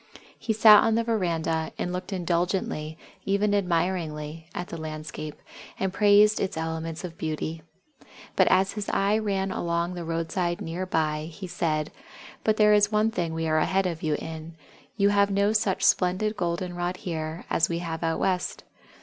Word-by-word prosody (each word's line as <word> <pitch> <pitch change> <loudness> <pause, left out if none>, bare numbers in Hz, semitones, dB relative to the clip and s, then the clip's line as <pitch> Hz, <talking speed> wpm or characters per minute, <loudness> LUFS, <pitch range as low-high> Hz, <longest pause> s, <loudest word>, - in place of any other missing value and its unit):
He 225 - -2
sat 215 -1 +8
on 225 - +2
the 230 - +2
veranda, 165 -7 -1
and 180 - -2
looked 180 +2 -5
indulgently 175 -3 -1 0.3
even 200 +1 +1
admiringly 165 -4 -1
at 180 - -5
the 165 - -6
landscape, 155 -1 -6 0.4
and 190 -1 -1
praised 210 +1 +5
its 190 - -2
elements 160 +1 -4
of 170 -2 -8
beauty. 160 +1 -3 0.7
But - - +4
as 190 +1 +3
his 205 -1 -5
eye 205 +2 +2
ran 195 -3 -1
along 170 0 -1
the 175 -1 -5
roadside 165 +1 -2
near 175 +3 -4
by, 155 -2 -1
he 190 +4 -8
said: 155 -4 -1 0.5
"But 215 -1 +2
there 210 -1 +6
is 205 0 +4
one 215 +1 +2
thing 175 -6 -1
that 160 - -5
we 165 0 -1
are 155 0 +2
ahead 190 +4 +1
of 170 -3 -3
you 155 -2 0
in 160 +1 -7 0.4
you 200 -1 +4
have 200 0 +3
no 200 +2 +2
such 210 -3 +1
splendid 185 +4 +2
Golden 175 -1 -2
rod 175 +1 -2
here 160 -2 -5
as 165 - +2
we 170 - -1
have 165 -1 -4
out 165 -1 0
West! 185 -1 -1
175 Hz, 175 wpm, -26 LUFS, 160-200 Hz, 0.7 s, sat